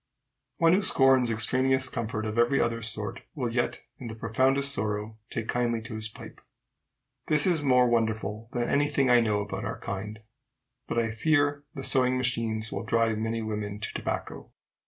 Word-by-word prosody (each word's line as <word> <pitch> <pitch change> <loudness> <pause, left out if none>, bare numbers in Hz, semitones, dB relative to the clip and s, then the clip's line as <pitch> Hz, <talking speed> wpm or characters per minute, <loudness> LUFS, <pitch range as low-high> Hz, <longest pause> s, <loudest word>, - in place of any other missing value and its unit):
One 165 0 +4
who 190 - +3
scorns 135 - +4
extraneous 130 +4 +3
comfort 110 -3 -4
of 110 +2 -2
every 120 +4 +3
other 115 0 0
sort, 110 -2 -3
will 125 -5 -3
yet, 120 0 -1 0.2
in 125 - -7
the 110 - -7
profoundest 130 +5 +1
sorrow, 105 -1 -3
take 115 -1 -4
kindly 120 -1 0
to 115 0 -8
his 110 0 -2
pipe. - - -12 0.9
This 150 -1 +4
is 175 -5 +2
more 125 -3 +4
wonderful 110 -1 -1
than 120 -1 -1
any 145 +1 +2
thing 140 -3 +2
I 120 - +7
know 105 -2 0
about 100 - -5
our - - -5
kind. 105 +2 -6 0.7
But - - -3
I 115 -1 +1
fear 145 +3 +1
the 135 - -6
sewing 130 -1 +3
machines 115 -3 -1
will - - -3
drive 115 -1 +1
many 115 +1 -2
women 105 -1 -4
to - - -5
tobacco. - - -5
115 Hz, 175 wpm, -27 LUFS, 110-130 Hz, 0.9 s, I